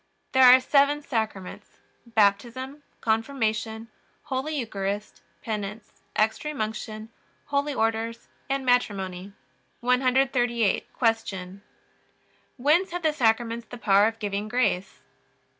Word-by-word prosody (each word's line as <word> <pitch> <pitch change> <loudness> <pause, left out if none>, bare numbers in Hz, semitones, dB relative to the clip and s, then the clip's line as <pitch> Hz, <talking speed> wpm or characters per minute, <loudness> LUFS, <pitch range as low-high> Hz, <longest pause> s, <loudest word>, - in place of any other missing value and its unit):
There 260 - +4
are 255 - +8
seven 285 +2 +3
Sacraments: 220 -8 -4 0.3
Baptism, 235 +6 +1 0.2
Confirmation, 220 -1 -1 0.3
Holy 290 +2 -3
Eucharist, 205 -4 -4 0.2
Penance, 210 -1 -5 0.2
Extreme 250 +8 0
Unction, 215 0 -4 0.4
Holy 285 0 -1
Orders, 225 +1 -1 0.2
and 270 -1 -1
Matrimony. 195 -6 0 0.5
138. 250 -3 +2
Q. 200 -5 -1 1.0
Whence 305 +9 +3
have 355 -1 -4
the 310 -1 +2
Sacraments 230 -2 +1
the 245 - -9
power 205 -2 +4
of 225 0 -3
giving 205 -1 -3
grace? 205 -6 -1
230 Hz, 100 wpm, -26 LUFS, 215-260 Hz, 1.0 s, are